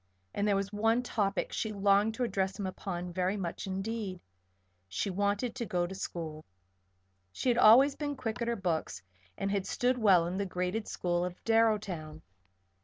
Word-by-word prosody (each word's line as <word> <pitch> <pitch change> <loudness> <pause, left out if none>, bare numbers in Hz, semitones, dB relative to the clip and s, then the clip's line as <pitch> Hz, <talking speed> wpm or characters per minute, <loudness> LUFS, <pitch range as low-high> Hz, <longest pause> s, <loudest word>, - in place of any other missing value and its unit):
And 205 - 0
there 205 - +3
was 195 +1 -2
one 225 +4 +2
topic 205 -5 -1
she 220 - -2
longed 200 +2 +3
to 250 - -1
address 190 -5 -1
him 200 - -3
upon 180 -2 -5
very 185 +3 0
much 185 +1 -4
indeed. 195 0 -3 0.7
She 95 - -2
wanted 205 +5 0
to 255 - -4
go 175 -2 0
to 180 - -6
school. 160 -5 -5 0.9
She 255 - -1
had 240 - +3
always 255 +6 +7
been 290 -1 -3
quick 240 -1 -4
at 235 - 0
her 235 - +1
books, 175 - -2 0.3
and 195 0 -1
had 200 -2 -1
stood 250 0 +1
well 190 -6 +5
in 180 +2 -3
the 200 - 0
graded 180 +4 -2
school 175 -1 -1
of 180 0 -3
Darrowtown. 205 -9 +1
200 Hz, 180 wpm, -31 LUFS, 180-225 Hz, 0.9 s, always